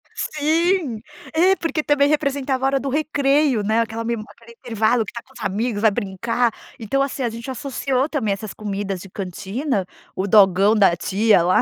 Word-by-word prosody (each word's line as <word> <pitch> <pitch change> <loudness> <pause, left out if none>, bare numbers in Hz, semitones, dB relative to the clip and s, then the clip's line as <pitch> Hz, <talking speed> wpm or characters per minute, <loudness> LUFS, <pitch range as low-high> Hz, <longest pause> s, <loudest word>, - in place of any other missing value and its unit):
Sim. 315 - 0 0.3
É. 360 +4 +4
Porque 330 -4 -2
também 285 -1 +3
representava 280 -3 0
a - - +4
hora 270 0 +1
do 275 - -3
recreio, 285 -4 +1
né? 220 +3 +1
Aquela 230 0 -3
memó 230 -2 -2
aquele 235 0 -16
intervalo 225 -1 +1
que - - -8
está 235 - -7
com 265 - -24
os - - -13
amigos, 210 +2 -1
vai 220 -1 +5
brincar. 225 +5 -1 0.3
Então, 235 +5 -1
assim, 275 -1 -2
a 235 - 0
gente 230 +3 -8
associou 265 +1 -1
também 235 -10 0
essas 200 -1 -7
comidas 200 -1 -4
de 195 - -11
cantina, 195 - -3 0.3
o 190 - -2
dogão 200 0 +5
da 195 -5 +4
tia 200 +1 +2
lá 180 +2 +3
235 Hz, 185 wpm, -21 LUFS, 205-275 Hz, 0.3 s, vai